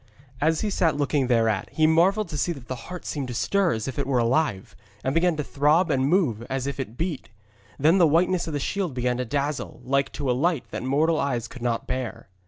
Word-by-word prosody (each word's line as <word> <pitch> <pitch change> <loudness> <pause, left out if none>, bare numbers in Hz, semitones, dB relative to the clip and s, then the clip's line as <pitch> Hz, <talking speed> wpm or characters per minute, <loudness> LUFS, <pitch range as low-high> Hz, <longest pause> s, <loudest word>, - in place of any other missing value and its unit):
As 160 +1 +2
he 210 - -1
sat 165 -6 +1
looking 145 -2 +1
thereat, 115 -5 +1
he 155 - +2
marvelled 185 +7 +3
to 150 - -4
see 175 - +1
that 135 -6 -12
the 130 0 -7
heart 180 -1 -7
seemed 140 -3 -3
to 120 - -5
stir 195 - +1
as 110 +2 -3
if 135 - -4
it 140 - -1
were 135 -2 +1
alive, 115 -6 0 0.3
and 130 - 0
began 170 +1 +2
to 150 - -1
throb 150 +5 +2
and 135 -1 +2
move 150 - +2
as 135 -1 -2
if 140 0 -4
it 120 -3 -5
beat. 165 -4 -3 0.5
Then 160 +7 +4
the 170 - +6
whiteness 175 +3 +2
of 160 - -4
the 145 - -1
shield 180 -2 -2
began 125 0 0
to 125 - -2
dazzle 140 +3 -3
like 135 +2 0
to 140 -3 -1
a - - +3
light 155 +2 0
that - - -4
mortal 155 +5 +1
eyes 120 -4 -1
could 125 - -11
not 120 -1 -1
bear. 120 -4 -4
140 Hz, 235 wpm, -25 LUFS, 125-165 Hz, 0.5 s, the